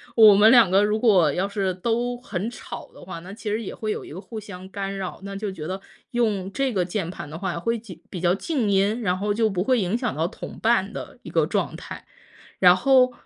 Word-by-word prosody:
我 215 -3 +9
们 210 +3 +7
2 235 -6 +7
个 195 +2 +4
如 210 +1 +1
果 185 - +5
要 185 +2 0
是 195 -2 -1
都 235 +5 -1
很 200 -4 -4
吵 - - -9
的 - - -14
话， 175 -1 -7
那 180 +4 -10
其 215 0 -6
实 220 +2 -1
也 - - -6
会 215 -1 -3
有 - - -4
一 - - -11
个 175 - -7
互 220 +1 -7
相 190 -3 -9
干 195 0 -4
扰。 190 -2 -5
那 200 0 -6
就 200 0 -3
觉 165 -5 -7
得 190 +1 -4 0.3
用 210 -6 0
这 270 +4 0
个 185 - +1
键 180 -1 -3
盘 180 - -7
的 155 - -7
话 180 -3 -2
会 230 +6 0
几 210 -6 -12
比 180 - -5
较 175 0 +3
静 245 -1 -1
音， 200 +4 +2
然 185 -4 0
后 205 +1 0
就 220 0 +2
不 185 -2 -1
会 255 +3 +2
影 185 +5 0
响 245 -2 -2
到 160 +2 0
同 - - -9
伴 220 -3 +2
的 - - -7
一 - - -8
个 - - +3
状 - - -1
态。 - - -9 0.5
然 180 -1 +7
后 255 +5 +4
200 Hz, 265 characters per minute, -24 LUFS, 185-225 Hz, 0.5 s, 我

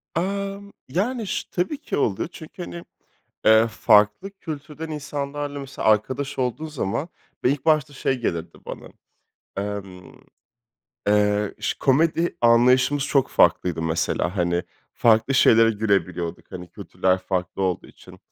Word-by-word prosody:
Amm. 200 +3 -3 0.2
Yani, 220 - -1
şı - - -3
tabii 185 +12 -1
ki - - -4
oluyor 105 -4 0
çünkü, 170 +2 -9
hani, 170 0 -8 0.6
eee, 110 +1 +6
farklı 105 - +3
kültürden 155 -4 -8
insanlarla 145 -1 -4
mesela 135 -4 -3
arkadaş 130 +7 +1
olduğun 130 +5 -1
zaman 145 - -3 0.4
ve 125 - +5
ilk 140 -1 -2
başta 155 -3 +3
şey 130 -1 -1
gelirdi, 85 -7 -3
bana. - - -7 0.7
Emm, 100 -2 -6 0.9
eee, 105 0 +2
şı - - -2
komedi 165 +5 +2
anlayışımız 125 +4 +4
çok 140 -2 +2
farklıydı 85 -1 +2
mesela. 85 +3 -1
Hani, 85 -1 +1 0.3
farklı 115 +3 +3
şeylere 115 -2 +6
gülebiliyorduk. 95 -6 -2
Hani, 90 -1 -7
kültürler 95 -1 0
farklı 95 0 -3
olduğu 90 -2 -1
için. - - -16
125 Hz, 130 wpm, -23 LUFS, 100-150 Hz, 0.9 s, eee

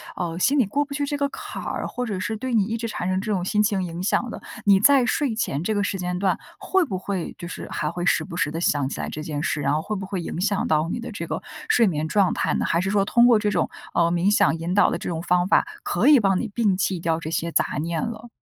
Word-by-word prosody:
呃， 170 -1 -3
心 280 +9 +3
里 240 - +4
过 285 +9 0
不 285 0 -8
去 285 0 -1
这 290 0 -2
个 280 0 0
坎 - - -7
儿， - - -3
或 250 - -4
者 200 -5 -3
是 210 +3 -2
对 255 +2 -4
你 215 -3 +4
一 225 +2 -2
直 230 0 -3
产 185 -4 -3
生 185 +1 0
这 215 - -3
种 180 -3 -1
心 210 +2 +2
情 200 -3 +1
影 170 0 -5
响 240 +4 +1
的。 - - -7 0.2
你 195 -1 +6
在 270 +2 +5
睡 260 -1 0
前 155 -8 -1
这 215 - 0
个 205 -1 0
时 200 - -2
间 180 0 -3
段， 190 -1 +1 0.2
会 380 -1 +2
不 190 -8 -3
会 190 -2 -4
就 170 - -7
是 - - -7
还 150 - -1
会 175 +1 -4
时 - - +3
不 175 -3 -8
时 150 -4 0
地 165 - -3
想 145 -5 +1
起 - - -6
来 - - -3
这 155 - -6
件 150 -2 -3
事， 155 -5 -1
然 - - +1
后 155 - +1
会 210 +5 -4
不 190 -1 -4
会 185 -2 -4
影 170 - -4
响 200 0 0
到 155 +1 +1
你 240 - -3
的 235 - -6
这 170 -5 -5
个 - - -3 0.3
睡 230 -3 +5
眠 155 -2 -1
状 195 +1 +2
态 - - 0
呢？ - - 0
还 170 - +1
是 190 - -1
说， 200 -1 +2
通 235 +3 +4
过 230 -3 +5
这 210 -1 0
种， - - 0 0.2
呃， 170 0 +3
冥 175 +3 +2
想 165 - +3
引 170 +2 -3
导 205 - +5
的 - - -1
这 - - -5
种 165 -1 -3
方 180 +1 +2
法， - - +4 0.2
可 200 +10 +1
以 295 -4 +8
帮 195 -3 +2
你 230 - -3
摒 205 -6 +2
弃 190 -2 0
掉 165 -1 0
这 160 - -6
些 170 0 -1
杂 - - 0
念 165 -1 -2
了？ 230 +1 -6
190 Hz, 320 characters per minute, -24 LUFS, 170-220 Hz, 0.3 s, 以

